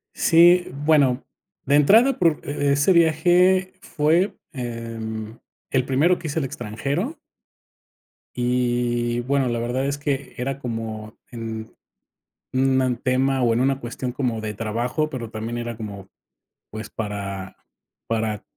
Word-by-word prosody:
Sí, 175 +2 +5
bueno, 140 -2 +2 0.4
de 140 - +3
entrada, 225 - +5
por 165 -4 +3
e 145 -1 +1
ese 145 +7 +3
viaje 175 +3 +4
fue, 165 +6 +1 0.2
em, 115 -4 -6 0.3
el 130 -2 +2
primero 155 +7 +2
que 160 - -6
hice 150 - -4
al 140 - -1
extranjero 140 - -3 1.2
y 120 -1 0
bueno, 135 +1 +1
la 120 -1 -1
verdad 125 +3 -1
es 140 +1 -1
que 145 -2 -3
era 135 +2 -3
como 110 -3 -5 0.2
en 115 -2 -6 0.8
un 130 -1 +2
tema 130 +1 +1
o 120 -2 +3
en 115 - +1
una 135 +1 +1
cuestión 125 +1 -5
como 125 -3 -2
de 110 -1 -4
trabajo, 120 +8 -2
pero 120 -6 -5
también 115 +1 -4
era 120 -1 -4
como 100 -3 -8 0.6
pues 110 +1 -7
para 100 -3 -5 0.5
para 110 -2 -1
125 Hz, 130 wpm, -23 LUFS, 115-145 Hz, 1.2 s, Sí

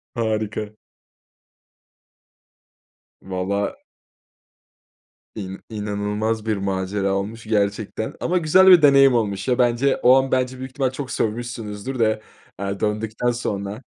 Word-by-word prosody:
Harika. 110 -1 -2 2.4
Vallaha. 95 +2 -2 1.6
İn 95 -2 -6
inanılmaz 105 +1 -2
bir 110 -2 0
macera 95 0 -1
olmuş 105 +4 -4
gerçekten 105 0 -1
ama 180 +1 0
güzel 180 +3 +5
bir 180 -4 +9
deneyim 135 -2 +6
olmuş 100 -3 -1
ya 125 -1 +2
bence. 125 +2 +2
O 125 +1 +5
an 135 0 0
bence, 130 0 0
büyük 130 0 -7
ihtimal 130 -1 -1
çok 130 -1 -6
sövmüşsünüzdür 115 +1 -3
de, 110 -1 +2 0.4
eee, 100 0 -3
döndükten 110 +3 -1
sonra. 105 -1 -4
110 Hz, 110 wpm, -22 LUFS, 100-125 Hz, 2.4 s, bir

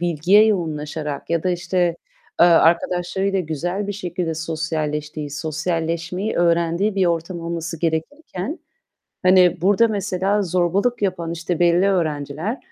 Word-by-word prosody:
bilgiye 175 +5 +4
yoğunlaşarak 155 -6 -3
ya 170 -1 +1
da 185 - +1
işte, 175 -1 0 0.4
eee, 175 - +8
arkadaşlarıyla 175 +3 +2
güzel 175 +5 -3
bir 205 - -3
şekilde 180 -4 -3
sosyalleştiği, 155 -2 -3
sosyalleşmeyi 165 +5 -2
öğrendiği 170 +4 +1
bir 190 -2 +2
ortam 170 +1 -2
olması 165 0 -4
gerekirken 180 - -3 0.7
hani 180 -2 +5
burada 205 +5 +4
mesela 200 -1 0
zorbalık 185 +6 0
yapan, 175 -4 -1
işte, 170 0 -3
belli 175 +2 +4
öğrenciler 160 - -2
175 Hz, 120 wpm, -21 LUFS, 160-190 Hz, 0.7 s, eee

